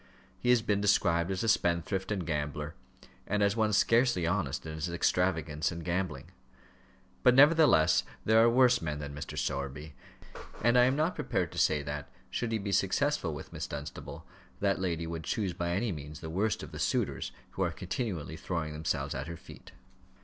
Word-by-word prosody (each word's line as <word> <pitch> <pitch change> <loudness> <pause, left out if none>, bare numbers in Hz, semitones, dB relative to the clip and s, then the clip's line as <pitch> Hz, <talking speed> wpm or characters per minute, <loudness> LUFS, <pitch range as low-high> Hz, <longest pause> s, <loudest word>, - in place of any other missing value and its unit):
He 125 - -1
has 125 -2 +5
been 105 -3 +1
described 85 -4 +2
as 95 +1 -2
a - - 0
spendthrift 95 0 +1
and 95 -4 -1
gambler, 75 -1 -3 0.5
and 105 +1 +1
as 100 +1 +2
one 110 -1 +2
scarcely 115 -3 +3
honest 80 -7 -1
in 80 - -5
his 80 +3 -3
extravagance 85 -2 0
and 85 -1 -7
gambling. 90 +1 -3 0.9
But 125 -1 +5
nevertheless 145 - +6 0.2
there 110 +1 +5
are 115 - +6
worse 125 0 +4
men 75 -2 -3
than 70 -1 -6
Mr. 70 -1 -7
Sowerby, 70 +2 -3 0.7
and 120 +2 +4
I 125 0 +7
am 130 +2 +2
not 155 +4 +1
prepared 95 - -2
to - - -4
say 75 -2 +2
that, 75 0 -5 0.2
should 120 -2 -2
he 110 - +1
be 100 -1 -4
successful 100 - +1
with 75 - -9
Miss - - -4
Dunstable, 75 0 -7 0.3
that 100 -2 +1
lady 85 -3 -1
would 80 0 -5
choose 100 -5 -1
by 85 0 -3
any 100 +6 0
means 75 -1 -7
the 80 - -7
worst 100 +5 0
of - - -9
the - - -8
suitors - - -1 0.2
who - - -5
are - - +2
continually 85 - -4
throwing 85 -4 -3
themselves 75 +1 -2
at 70 +1 -4
her 85 0 -6
feet. - - -14
90 Hz, 185 wpm, -30 LUFS, 80-110 Hz, 0.9 s, I